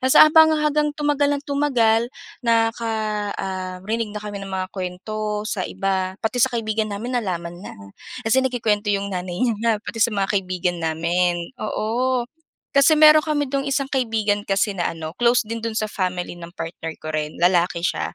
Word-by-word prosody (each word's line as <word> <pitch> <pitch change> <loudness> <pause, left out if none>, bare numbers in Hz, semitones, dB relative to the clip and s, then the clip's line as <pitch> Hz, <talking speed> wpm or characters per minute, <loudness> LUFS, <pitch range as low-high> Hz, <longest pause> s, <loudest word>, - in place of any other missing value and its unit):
Tapos 260 0 +3
habang 315 +1 +8
hanggang 300 0 +1
tumagal 290 -1 +1
ng 285 - -9
tumagal, 240 -6 +2 0.3
nakaka 230 -1 +1 0.5
um, 185 -1 -4
rinig 225 +1 -1
na - - -4
kami 205 -1 -5
ng 195 - -7
mga 190 -1 -2
kuwento 210 +3 -4
sa 215 -2 -3
iba. 190 -1 -1
Pati 245 +2 0
sa 260 - +5
kaibigan 220 -1 -1
namin 240 +5 -2
nalaman 175 -3 -4
na, - - -9 0.5
kasi 260 - +5
nagkukuwento 220 -4 0
'yong 200 0 -2
nanay 180 +1 -3
niya 235 -2 +2
na 230 +1 +1
pati 225 - -7
sa 225 -1 +2
mga 195 0 0
kaibigan 180 -2 -2
namin. 170 +2 0
Oo, 240 +4 -1 0.5
kasi 280 +3 +5
mayro'n 310 0 +8
kami 290 -3 0
do'ng 275 0 -1
isang 275 0 -1
kaibigan 220 -5 0
kasi 200 +2 +1
na 175 - +1
ano, 160 -1 -6
close 240 0 +4
din 230 +1 -5
do'n 225 0 -4
sa 215 -1 -1
family 180 -2 -3
ng 170 0 -10
partner 165 -1 -6
ko 155 - -5
rin, 155 -1 -2
lalaki 175 -1 +3
siya. 175 - -1
215 Hz, 180 wpm, -22 LUFS, 185-245 Hz, 0.5 s, habang